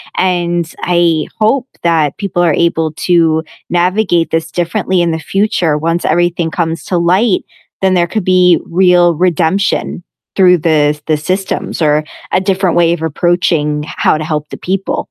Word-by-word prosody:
and 175 -2 0
I 170 -3 +1
hope 255 +4 +1
that 160 -4 +1
people 185 -3 -1
are 165 -3 +2
able 165 -2 0 0.2
to 165 -2 +2 0.3
navigate 175 -1 +1
this 165 0 -2
differently 180 +1 -1
in 170 - +1
the 160 - -1
future 180 -2 0
once 165 +3 -1
everything 175 -1 0
comes 165 -3 -2
to 180 -2 -1
light 185 +4 +1 0.4
then 190 -1 +2
there 175 - +3
could 215 -2 -3
be 180 -1 +4
real 175 -1 +3
redemption 180 +1 0 0.3
through 180 -2 +5
the 165 - -1 0.2
s 150 - -16
the 155 -1 +1
systems 185 +2 -3
or 150 0 +2 0.3
a - - +2
different 190 -2 0
way 170 -1 +3
of 165 - -5
approaching 160 -2 0
h - - -11
how - - +2
to - - -3
help 150 -1 -3
the - - -8
people. 195 0 -1
175 Hz, 165 wpm, -13 LUFS, 160-185 Hz, 0.4 s, through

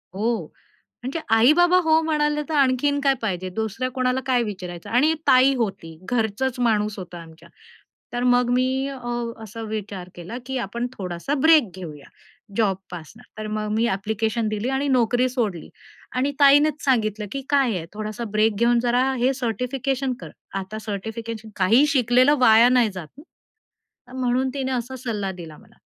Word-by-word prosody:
हो. 225 +3 -1 0.6
म्हणजे 275 +6 -3 0.2
आई-बाबा 345 +10 +5
हो 320 0 +5
म्हणाले, 300 -1 0
तर - - -3
आणखीन 280 +2 +2
काय 275 -1 +3
पाहिजे? 185 -3 -2
दुसऱ्या 220 +4 -2
कोणाला 255 0 0
काय 250 -2 +2
विचारायचं 180 -5 -7
आणि 290 +7 +3
ताई 260 +2 +6
होती. 190 -8 -4
घरचाच 245 +2 -1
माणूस 215 -3 +1
होता 175 -1 -8
आमच्या. 160 0 -15 0.6
तर 245 0 -1
मग 245 -1 +3
मी 260 +2 +1
अ, 275 -1 -6 0.5
असा 220 +2 -8
विचार 200 -4 -5
केला 175 +8 -7
की 265 0 -3
आपण 235 +5 -4
थोडासा 180 +7 -4
ब्रेक 315 -9 +5
घेऊया, 150 -6 -9 0.5
जॉबपासनं. 190 -1 -3 0.2
तर 215 0 -5
मग 215 0 -2
मी 230 +1 +2
ॲप्लिकेशन 220 +3 -1
दिली 215 +4 -2
आणि 270 +2 -1
नोकरी 250 -1 +2
सोडली 215 -10 -3 0.5
आणि 270 +3 +1
ताईनेच 290 +1 +5
सांगितलं 215 -5 +1
की 275 - -4
काय 270 -7 +2
आहे, 165 - -6
थोडासा 215 +2 -5
ब्रेक 215 0 +2
घेऊन 235 0 +3
जरा 250 +2 +2
हे 255 +3 +2
सर्टिफिकेशन 255 +2 -2
कर. 160 - -8 0.3
आता 195 +3 -7
सर्टिफिकेशन 220 +1 -6
काही 225 +10 +4
शिकलेलं 255 +1 +4
वाया 230 0 +6
नाही 245 -3 +3
जात 175 -5 -7 0.8
ना. 250 0 -21
म्हणून 255 +1 +1
तिने 265 -2 -2
असा 250 +1 -3
सल्ला 210 -6 -3
दिला 165 -4 -10
मला. - - -21
235 Hz, 160 wpm, -23 LUFS, 210-260 Hz, 0.8 s, ताई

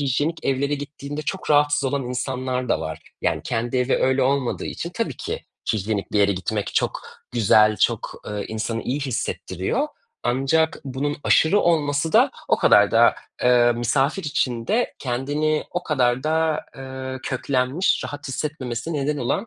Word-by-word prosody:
hijyenik 145 +4 -1
evlere 140 +2 +1
gittiğinde 145 +1 -6
çok 185 +3 -4
rahatsız 145 -1 +4
olan 135 +1 0
insanlar 125 0 -2
da - - +1
var. 80 0 -4 0.2
Yani - - +1
kendi 120 +3 -1
evi 125 +1 +2
öyle 130 0 +2
olmadığı 135 -1 0
için 170 - -5
tabii 230 -1 -2
ki 455 +4 -5 0.3
hijyenik 105 -1 -2
bir 105 - +2
yere 100 0 +4
gitmek 100 +3 -3
çok - - 0 0.3
güzel, 110 -2 +5
çok, - - -1
eee, 105 -1 -3
insanı 110 +1 -3
iyi 135 +4 -2
hissettiriyor. 115 - -2 0.3
Ancak 135 +6 +1
bunun 140 +2 -2
aşırı 195 +6 +4
olması 155 -2 +1
da - - +5 0.2
o - - +4
kadar - - +5
da, - - +5 0.3
eee, 120 -1 +5
misafir 135 +9 0
içinde 145 - 0
kendini 145 +5 -1
o 180 0 -2
kadar 130 -5 +1
da, 160 0 +1 0.2
eee, 130 0 -6
köklenmiş, 130 +6 0
rahat 145 -1 -6
hissetmemesine 135 0 -3
neden 150 +1 0
olan, 140 - -1
135 Hz, 150 wpm, -23 LUFS, 120-150 Hz, 0.3 s, güzel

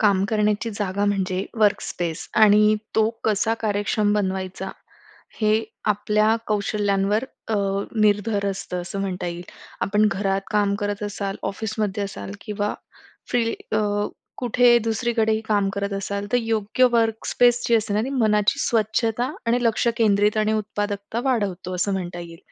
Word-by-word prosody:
काम 200 -3 +3
करण्याची 215 +1 +1
जागा 200 -1 -1
म्हणजे 190 -2 0
वर्कस्पेस 200 -5 0 0.2
आणि 210 0 +5 0.2
तो 220 0 +4 0.2
कसा 220 +1 +2
कार्यक्षम 205 0 +1
बनवायचा, 190 -2 -2 0.7
हे 215 +1 +2 0.3
आपल्या 215 +2 +2
कौशल्यांवर 205 +1 +1 0.2
अ, 225 - 0 0.5
निर्भर 205 0 +2
असतं 180 -2 -4
असं 185 +3 -5
म्हणता 185 -2 -3
येईल. 175 0 -4 0.4
आपण 210 +2 +3
घरात 195 0 0
काम 205 -1 +2
करत 205 0 -2
असाल, 200 -1 -3
ऑफिसमध्ये 210 -1 -2
असाल 195 -1 -7
किंवा 210 -1 -2 0.6
फ्री 230 -2 +1 0.2
अ, 215 - +3 0.6
कुठे 245 -1 +4
दुसरीकडेही 225 -1 +1
काम 205 -2 +2
करत 200 0 -2
असाल, 200 +1 -3
तर - - +5
योग्य 225 +2 +1
वर्कस्पेस 235 +1 +2
जी 235 - +3
असते 215 -2 -1
ना, 210 - +2
ती 265 - -4
मनाची 215 -2 +2
स्वच्छता 225 +2 +1 0.2
आणि 235 +1 +3
लक्ष 230 +1 +1
केंद्रित 210 -1 +3
आणि 215 0 +2
उत्पादकता 205 0 -2
वाढवतो 200 -8 -1
असं 185 +3 0
म्हणता 175 -2 -4
येईल. 170 -1 -10
210 Hz, 140 wpm, -23 LUFS, 200-220 Hz, 0.7 s, आणि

